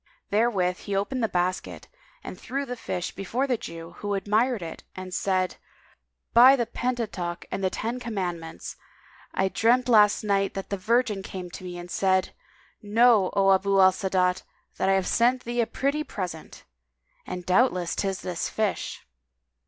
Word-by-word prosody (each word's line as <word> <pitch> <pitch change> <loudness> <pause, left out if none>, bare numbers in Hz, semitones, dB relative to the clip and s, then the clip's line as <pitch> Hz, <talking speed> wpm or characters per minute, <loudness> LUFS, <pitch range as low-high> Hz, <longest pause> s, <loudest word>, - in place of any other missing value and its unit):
Therewith 200 -5 +2
he 200 - 0
opened 225 +6 -1
the 225 - +2
basket 180 +1 -2 0.4
and - - -7
threw 275 +2 -3
the 250 - -5
fish 180 -6 -4
before 230 +7 -2
the 260 -3 +1
Jew 165 -7 -8
who 205 -1 -2
admired 215 +2 +1
it 165 - -8
and 185 -1 -7
said, 185 -1 0 0.8
"By 250 +3 +8
the 240 -3 0
Pentateuch 220 -8 -3
and 195 - -3
the 190 - +2
Ten 230 +6 -3
Commandments, 180 -8 -5 0.6
[FN#203] - - +1
I 190 - +3
dreamt 240 +5 +2
last 210 -3 +5
night 195 -1 +1
that 195 0 -6
the 200 - -1
Virgin 215 0 +1
came 185 -2 -7
to 185 - -9
me 180 -1 -6
and 175 0 -9
said, 190 -1 +1 0.5
'Know, 215 -1 +4
O 195 -1 +4
Abu 195 +1 +2
al 190 0 +7
Sa'adat, 185 -1 0 0.4
that - - +1
I - - +5
have 190 -1 +1
sent 245 +2 +2
thee 240 0 -1
a 225 - 0
pretty 285 +3 -1
present!' 180 - -7 0.6
and 180 -1 -5
doubtless 185 -3 +2
'tis 195 -1 -2
this 180 -2 -3
fish." 215 -2 -2
195 Hz, 170 wpm, -26 LUFS, 185-235 Hz, 0.8 s, By